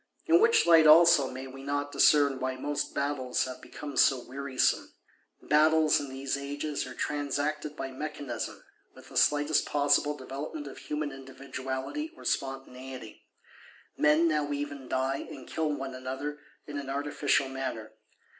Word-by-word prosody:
In 335 +1 +5
which 455 +2 +5
light 165 -2 +7
also, 155 -4 +7
may 130 +1 -7
we 135 0 -10
not 145 +1 -2
discern 140 -3 +4
why 130 0 -2
most 145 +3 -3
Battles 140 -3 0
have 130 -1 -8
become 145 -2 -8
so 130 +1 +4
wearisome? 135 0 0 0.5
Battles, 155 +1 +4
in 145 -1 -6
these 135 +1 -3
ages, 140 0 -4
are 130 - -9
transacted 145 +1 -2
by 135 -3 -5
mechanism; 135 -3 -5 0.3
with - - -15
the - - -13
slightest 145 +1 +3
possible 145 0 +2
developement 145 +3 -6
of 140 - -9
human 150 -1 -3
individuality 135 - -5
or - - -13
spontaneity: 130 -3 -5 0.7
men 150 +3 +4
now 150 -2 0
even 145 -2 -4
die, 130 +1 0
and 130 -3 -9
kill 160 -1 -1
one 135 -2 -4
another, 135 +3 -5 0.3
in 145 -1 -5
an 140 -1 -7
artificial 140 0 +1
manner. 130 -5 -5
140 Hz, 145 wpm, -29 LUFS, 135-150 Hz, 0.7 s, light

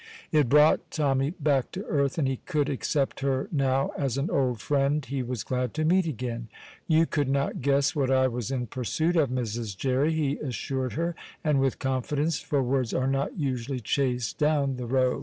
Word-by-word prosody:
It 150 -6 +3
brought 150 +3 +5
Tommy 135 -2 +1
back 140 -4 +1
to 195 +3 -5
earth, 140 -1 0
and 145 -5 +1
he 135 -1 -1
could 150 -2 -1
accept 140 0 -1
her 135 -1 0
now 135 -3 +1
as 135 -3 -1
an 140 +4 -1
old 125 -4 +1
friend 140 +3 +1
he 135 +2 -3
was 125 -4 -3
glad 125 -1 -2
to 155 0 0
meet 180 +2 +3
again. 120 -4 -4 0.4
"You 160 -1 +4
could 145 -4 -1
not 140 0 0
guess 140 +5 +2
what 135 -3 +1
I 130 0 +4
was 120 -2 -3
in 130 -2 -1
pursuit 130 - -1
of, 155 -6 +3
Mrs. 115 -5 -3
Jerry," 135 +6 +1
he 150 -3 0
assured 130 -1 -3
her, 170 +2 -1 0.3
and 150 -3 +2
with 135 -1 +1
confidence, 140 +4 -1
for 140 -2 0
words 125 -2 0
are 130 - +1
not 135 +4 -1
usually 130 -3 -2
chased 125 +1 -1
down 145 -3 +2
the 125 -1 -5
Row. 130 0 +2
135 Hz, 195 wpm, -27 LUFS, 130-150 Hz, 0.4 s, brought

